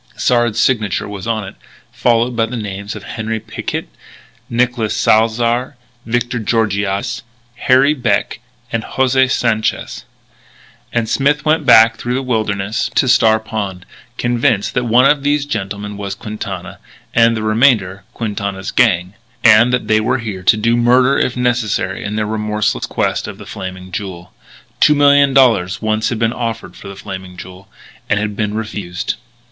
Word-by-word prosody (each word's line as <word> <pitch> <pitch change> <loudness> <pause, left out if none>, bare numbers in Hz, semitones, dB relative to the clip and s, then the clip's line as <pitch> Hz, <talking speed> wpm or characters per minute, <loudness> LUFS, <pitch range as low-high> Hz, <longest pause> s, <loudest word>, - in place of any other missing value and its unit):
Sard's 120 -3 +1
signature 110 -7 +1
was 100 0 -7
on 110 -2 -1
it, - - -9 0.4
followed 120 +1 +1
by 115 -1 +1
the 125 +2 -5
names 100 -1 -5
of 105 - -9
Henri 110 +1 -4
Picquet, - - -5 0.6
Nicolas 120 -2 0
Salzar, 115 +4 +2 0.3
Victor 120 +1 -1
Georgiades, 110 +1 -1 0.4
Harry 130 +4 +4
Beck, 120 -8 -1 0.3
and 115 - -1
José 130 +1 +1
Sanchez. 115 -4 -1 0.9
And 115 -2 -1
Smith 140 +5 +1
went 155 -1 +1
back 115 -1 +7
through 120 +1 -3
the 135 - -2
wilderness 110 -4 -1
to - - +3
Star 110 -3 +4
Pond, 100 -4 -5 0.3
convinced 115 -4 0
that 125 - 0
one 120 +3 +4
of 145 0 +4
these 145 0 +1
gentlemen 105 -4 -4
was 100 -1 -5
Quintana, 105 +1 -7 0.3
and 115 -1 +4
the 110 - -3
remainder, 110 -4 +2
Quintana's 100 -3 -4
gang; 90 +3 +2 0.3
and 115 +1 +6
that 125 - -1
they 110 0 +3
were 125 +4 +1
here 110 -6 -5
to 95 - +3
do 115 +2 +2
murder 125 +3 +3
if 125 - -1
necessary 115 -6 -1
in 105 +1 -4
their 110 0 -1
remorseless 105 -1 -1
quest - - -1
of - - -8
"The - - -11
Flaming 95 0 -8
Jewel." 90 -3 -7 0.5
Two 150 - +5
million 140 -1 +4
dollars 100 -8 +3
once 110 +1 0
had 120 - -2
been 115 +1 0
offered 115 -6 -5
for - - -11
the 100 - -8
Flaming 95 -2 -8
Jewel; 95 +1 -11 0.4
and 100 - +2
had 105 -1 -3
been 105 0 -2
refused. 105 -5 -4
110 Hz, 155 wpm, -16 LUFS, 100-120 Hz, 0.9 s, back